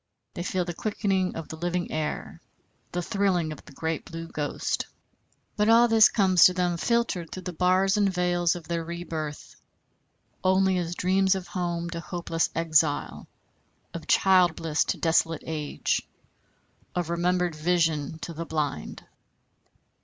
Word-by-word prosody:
They - - -5
feel 180 0 -1
the 175 - -4
quickening 195 -1 -1
of 165 - -6
the - - -6
living 175 +1 -2
air, 155 -1 -4 0.5
the 175 0 -2
thrilling 190 -6 0
of 155 - -9
the - - -13
great 160 +3 -3
Blue 165 0 -7
Ghost. 150 -3 -2 0.7
But 210 +1 +2
all 235 +1 +7
this 225 -2 +6
comes 185 -4 +4
to 180 - +5
them, 175 -2 0
filtered 220 -5 0
through 185 - -7
the 180 0 -5
bars 185 +3 +2
and 200 -2 +3
veils 175 -1 +1
of 170 -2 -9
their 170 0 -2
rebirth, 165 -3 -6 0.9
only 190 0 +3
as 175 0 -3
dreams 190 +1 +2
of 190 -2 -4
home 175 -1 -2
to 170 - -4
hopeless 170 -1 -2
exile, 160 -3 +1 0.7
of 170 - -7
child 185 -3 +4
bliss 160 -2 0
to - - -1
desolate 165 -1 +1
age, 155 -3 -2 0.9
of 175 -2 -1
remembered 175 0 +1
vision 160 -2 0
to 170 - -5
the 165 +1 -5
blind! 150 - -3
175 Hz, 150 wpm, -26 LUFS, 165-185 Hz, 0.9 s, all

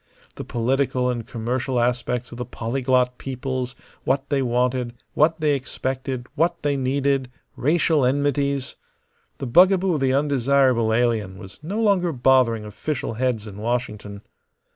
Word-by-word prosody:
The - - -7
political 125 +1 0
and 120 -2 -5
commercial 125 +2 -2
aspects 125 0 -1
of 120 - -9
the - - -1
polyglot 125 +1 0
peoples, 130 0 -4 0.3
what 135 +1 0
they 140 -2 +1
wanted, 125 0 0 0.2
what 160 +2 +3
they 150 -2 +2
expected, 130 -1 -3
what 170 +2 0
they 145 -1 +1
needed; 135 0 0 0.3
racial 155 +1 +2
enmities. 140 0 0 0.6
The - - -5
bugaboo 185 +7 +5
of 150 - -1
the 130 -1 +2
undesirable 135 -4 +2
alien 110 -5 0
was 95 -2 -12
no 190 +8 -4
longer 195 -6 +2
bothering 125 -4 +3
official 115 +5 -4
heads 120 -2 -1
in 100 -2 -9
Washington. 105 -3 -3
130 Hz, 140 wpm, -23 LUFS, 120-140 Hz, 0.6 s, bugaboo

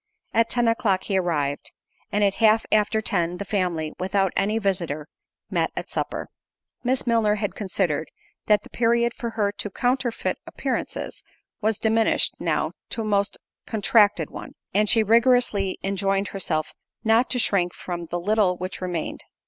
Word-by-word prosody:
At 230 0 +3
ten 240 -1 +2
o'clock 215 -5 +2
he 195 -2 +1
arrived; 145 -6 -1 0.4
and 205 0 +2
at 200 -1 +3
half 220 0 +5
after 215 +1 +3
ten 175 -3 0
the 200 - -5
family, 175 -6 -1
without 195 0 +1
any 210 +3 +1
visitor, 175 -8 -1 0.4
met - - +1
at - - -5
supper. - - -3 0.6
Miss 255 +1 +1
Milner 225 -3 +3
had 205 -2 -2
considered, 180 -6 -1 0.4
that 210 -1 +4
the - - -15
period 235 0 +2
for 235 - -4
her 205 -2 +2
to 205 0 -5
counterfeit 245 +3 -1
appearances, - - -3 0.4
was 220 0 +1
diminished 220 0 +2
now - - 0 0.2
to 230 - -3
a - - -3
most 200 -1 +1 0.3
contracted 215 -1 +3
one; - - -8 0.2
and 210 0 +3
she 225 -2 +6
rigorously 230 -3 +3
enjoined 195 0 0
herself 160 -5 -2 0.3
not 225 +2 +3
to 250 - 0
shrink 185 -7 +2
from 175 -1 -6
the 175 +2 -3
little 200 -1 +2
which 185 +1 -5
remained. 175 -3 -3
205 Hz, 155 wpm, -24 LUFS, 185-225 Hz, 0.6 s, she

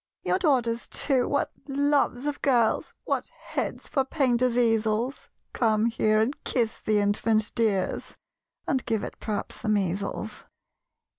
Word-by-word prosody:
"Your - - +1
daughters, 245 -9 +1
too, 265 -4 +1
what 285 - 0 0.2
loves 280 -2 +1
of 295 -1 -2
girls 240 -5 +2
What - - -2 0.2
heads - - -3
for 275 -3 +1
painters' 255 -3 +1
easels! 225 +1 +1 0.2
Come 220 -2 +2
here, 215 -2 +2
and 235 +7 -1
kiss 230 -3 -1
the 215 -1 +1
infant, 210 +2 +2
dears 210 -5 0 0.5
(And 265 -6 0
give 220 -3 0
it, - - -7
p'raps, 210 -2 -4
the 215 - -2
measles!) 200 +2 -1
230 Hz, 135 wpm, -27 LUFS, 215-265 Hz, 0.5 s, girls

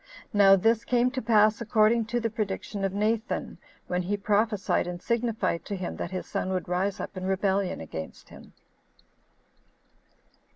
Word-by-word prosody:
Now 200 -1 +7
this 225 +4 +2
came 250 0 +2
to 260 0 -3
pass 215 -1 +3
according 225 0 +3
to 240 +3 -1
the 230 -1 -2
prediction 205 -1 -3
of 195 - +1
Nathan, 215 +3 -1 0.3
when 180 0 -1
he 200 +3 -2
prophesied 210 -1 +1
and 175 0 -5
signified 230 -5 -1
to 200 - -4
him 180 -2 -5
that - - -4
his 185 -1 -4
son - - -3
would 180 -3 -2
rise 185 +3 -1
up - - -6
in 185 0 -5
rebellion 190 0 0
against 80 0 -8
him. - - -14
205 Hz, 160 wpm, -27 LUFS, 190-225 Hz, 0.3 s, Now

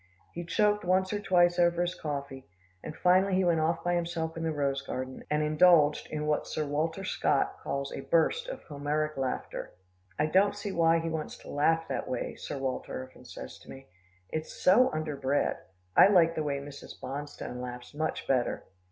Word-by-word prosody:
He 175 - -5
choked 210 +4 +2
once 185 +2 +2
or 205 - -1
twice 175 -2 +3
over 175 0 +3
his 175 0 -1
coffee, 140 -4 -5 0.4
and 155 - -6
finally 185 +2 +3
he 190 - +3
went 170 -2 +3
off 165 +1 0
by 175 - +1
himself 170 -2 -2
in 165 - -5
the 165 -1 0
rose 140 -2 -1
garden, 130 -1 -5
and 150 0 +1
indulged 155 -1 +4
in 150 -1 -3
what 150 0 0
Sir 155 - -2
Walter 160 +6 -2 0.6
calls 140 0 -3
a - - -5
burst 450 - +1
of - - -7
Homeric 150 +1 -2
laughter. 130 -1 -4 0.4
"I - - +2
don't 195 +6 +3
see 205 0 -4
why 165 -2 +4
he 165 0 -2
wants 160 -1 -4
to - - -9
laugh 160 +3 +2
that - - -3
way," 125 - -3
Sir 145 - -6
Walter 130 - -4
often - - -18
says 65 - -9
to - - -17
me. 135 0 -11 0.4
"It's 155 0 -4
so 245 +8 +6
underbred. 145 -3 -1 0.4
I - - +9
like 175 -5 +5
the 160 - -2
way 145 -2 -1
Mrs. 140 0 -10
Bonstone 140 -2 -6
laughs 125 +1 -7
much 155 +2 -3
better." 125 -3 +1
155 Hz, 185 wpm, -29 LUFS, 145-175 Hz, 0.6 s, I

